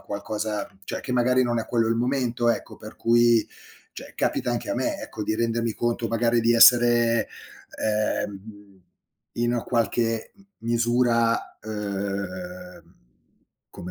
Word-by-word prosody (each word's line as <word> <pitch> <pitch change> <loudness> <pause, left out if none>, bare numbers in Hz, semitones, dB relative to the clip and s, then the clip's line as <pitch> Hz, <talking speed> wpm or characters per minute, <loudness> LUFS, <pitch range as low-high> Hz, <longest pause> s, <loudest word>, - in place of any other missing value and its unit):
qualcosa 105 0 -4 0.2
cioè - - -5
che 125 - -5
magari 125 +1 +3
non 120 -1 0
è - - -7
quello 115 -2 +1
il 115 - +1
momento, 120 -1 0
ecco, - - -4
per 110 0 -11
cui 120 -1 +3 0.5
cioè - - -10
capita - - -1
anche - - -3
a - - 0
me, - - -1
ecco, 105 - -7
di 110 - -1
rendermi 115 0 0
conto 120 0 -1
magari 115 +1 +1
di 115 +1 +3
essere, 120 -1 +6 0.6
ehm, 105 -1 0
mhmm, 100 -1 -13 0.5
in 120 0 0
qualche 115 -1 -1
m 195 - -21 0.2
misura, 115 0 +1
uhm, 110 - -6 0.8
come 90 - -9
115 Hz, 140 wpm, -24 LUFS, 110-120 Hz, 0.8 s, essere